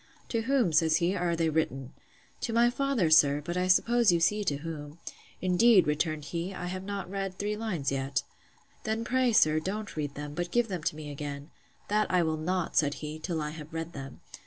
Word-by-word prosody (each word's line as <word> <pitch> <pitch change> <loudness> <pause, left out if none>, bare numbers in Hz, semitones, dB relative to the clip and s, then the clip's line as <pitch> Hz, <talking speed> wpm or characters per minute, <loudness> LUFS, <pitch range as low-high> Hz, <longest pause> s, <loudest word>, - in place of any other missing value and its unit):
To 230 - 0
whom, 245 - +1
says 160 0 +4
he, 175 +3 +1
are 175 -2 0
they 165 -1 +1
written?—To 150 - -4
my 235 +1 +4
father, 255 - 0
sir; 145 -2 +6
but 170 +4 -5
I 180 0 0
suppose 235 +3 +4
you 170 - +2
see 210 +5 +2
to 145 - +1
whom.—Indeed, 170 +7 +1
returned 150 0 -1
he, 170 +5 -4
I 180 - -5
have 185 +1 -4
not 200 -2 -4
read 195 0 -4
three 210 +1 -2
lines 190 -11 -2
yet. 135 0 -1 0.6
Then, 220 +1 -2
pray, 255 0 +2
sir, 155 -8 +4
don't 200 +5 -4
read 145 -2 -3
them; 145 0 -6
but 175 +2 -3
give 240 +3 +1
them 180 -4 -3
to - - 0
me 150 -1 -7
again. 145 +1 -6 0.4
That 210 +1 +1
I 180 -1 +3
will 160 -1 -1
not, 180 +2 -2
said 145 -1 +3
he, 155 +1 -6
till 160 -1 -3
I 150 - -3
have 155 0 -10
read 165 +1 -4
them. 135 -1 -9
170 Hz, 205 wpm, -29 LUFS, 150-205 Hz, 0.6 s, sir